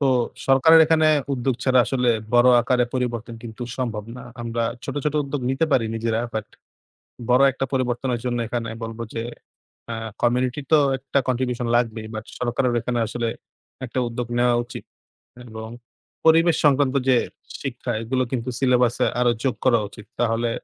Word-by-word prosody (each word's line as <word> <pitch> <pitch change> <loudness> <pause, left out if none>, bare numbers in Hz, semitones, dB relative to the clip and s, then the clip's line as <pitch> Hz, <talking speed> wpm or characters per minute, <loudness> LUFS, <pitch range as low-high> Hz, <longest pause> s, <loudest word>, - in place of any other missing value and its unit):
তো 140 - +2 0.4
সরকারের 160 +5 +6
এখানে 160 -1 +3 0.3
উদ্যোগ 130 0 0
ছাড়া 130 -1 +4
আসলে 125 -2 0 0.3
বড় 120 +1 +6
আকারে 125 0 +2
পরিবর্তন 120 -2 -2
কিন্তু 120 +1 -8 0.2
সম্ভব 115 -5 -3
না। 125 - -9 0.2
আমরা 115 0 -2 0.2
ছোট, - - -4
ছোট 150 0 0
উদ্যোগ 140 0 -4
নিতে 135 +5 +1
পারি 120 -4 +3
নিজেরা 115 0 -1
বাট 110 -2 -2 0.8
বড় 125 +2 +5
একটা 135 +1 -3
পরিবর্তনের 125 -1 -1
জন্য 120 -1 -1
এখানে 115 0 -3
বলব, 115 0 -6
যে, 115 - -3 0.7
আ - - -2 0.3
community 125 +2 +1
তো 155 - +7 0.2
একটা 140 +1 -1
contribution 125 -1 -1
লাগবেই। 115 -2 0
but 110 +1 -6
সরকারেরও 125 0 0
এখানে 120 0 -2
আসলে 120 +1 -2 0.6
একটা 130 +1 -3
উদ্যোগ 120 0 -4
নেওয়া 120 0 +3
উচিত 120 - -9 0.7
এবং 110 0 -7 0.6
পরিবেশ 165 +1 +5
সংক্রান্ত 140 -2 +3
যে, 130 - +6 0.4
শিক্ষা - - -4
এগুলো 130 +3 0
কিন্তু 125 -1 -2
syllabus 125 -2 +3
এ - - +2
আরও 125 -1 +4
যোগ 135 -3 +1
করা 120 -3 +5
উচিত। 105 0 -13
তাহলে 115 0 +1
125 Hz, 160 wpm, -23 LUFS, 115-130 Hz, 0.8 s, তো